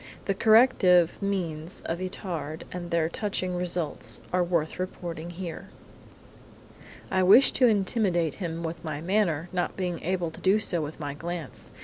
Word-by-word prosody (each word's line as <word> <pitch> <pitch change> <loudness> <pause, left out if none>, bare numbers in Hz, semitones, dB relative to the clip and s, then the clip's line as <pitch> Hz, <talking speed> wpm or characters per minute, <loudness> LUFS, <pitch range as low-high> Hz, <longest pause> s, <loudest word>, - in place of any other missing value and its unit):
The 195 - +1
corrective 195 -6 +5
means 180 -4 -3
of 165 +1 -2
Itard 175 -4 -4
and 175 -1 -6
their 170 -2 +1
touching 185 0 -2
results 175 -3 -3
are 180 0 +3
worth 170 -2 -1
reporting 175 -2 -5
here! 175 -1 -7 1.4
"I 190 -1 +2
wished 200 +9 +7
to 255 - +6
intimidate 195 - +2
him 170 -1 -3
with 165 0 -5
my 155 -3 -4
manner, 175 -2 0
not 180 -1 -1
being 180 -3 -2
able 180 -2 -1
to - - -12
do 190 +2 +4
so 180 -5 -1
with 150 +1 -6
my 145 -2 -4
glance. 170 +2 -6
175 Hz, 150 wpm, -27 LUFS, 165-190 Hz, 1.4 s, wished